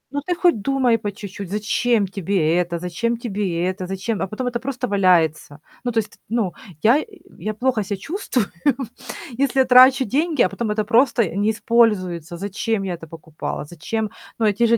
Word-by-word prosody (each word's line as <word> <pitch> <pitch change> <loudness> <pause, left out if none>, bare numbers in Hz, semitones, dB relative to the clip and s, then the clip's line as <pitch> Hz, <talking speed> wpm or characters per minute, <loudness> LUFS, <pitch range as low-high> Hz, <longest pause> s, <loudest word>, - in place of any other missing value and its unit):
Ну, 285 - 0
ты 355 - +1
хоть 345 - +3
думай 250 -1 +2
по 205 -1 -3
чуть-чуть, 200 -1 -8
зачем 210 +2 +1
тебе 185 -4 0
это, 175 -1 0
зачем 180 +7 -2
тебе 200 -7 -2
это, 185 0 -3
зачем 195 +1 -3
а - - 0
потом 215 +6 -4
это 245 -1 -1
просто 250 -1 -3
валяется. 170 -7 +2 0.2
Ну, 245 - -1
то 230 - -4
есть, 210 - -14
ну, 220 -5 0 0.3
я 255 +8 +5 0.4
я 215 0 -3
плохо 245 0 +1
ся 200 +1 -3
чувствую, 265 - -2 0.9
если 270 -1 +3
я - - +3
трачу 255 +1 +7
деньги, 295 - +1
а - - +2
потом 235 -2 -3
это 210 0 0
просто 235 0 +3
не 205 +2 +2
используется. 190 -7 +1
Зачем 200 +3 -2
я 190 -2 -2
это 165 -1 -9
покупала? 160 -2 -6
Зачем? 205 +8 -4 0.3
Ну, 225 - +1
эти 210 +2 +3
же 235 0 +4
215 Hz, 185 wpm, -21 LUFS, 185-240 Hz, 0.9 s, трачу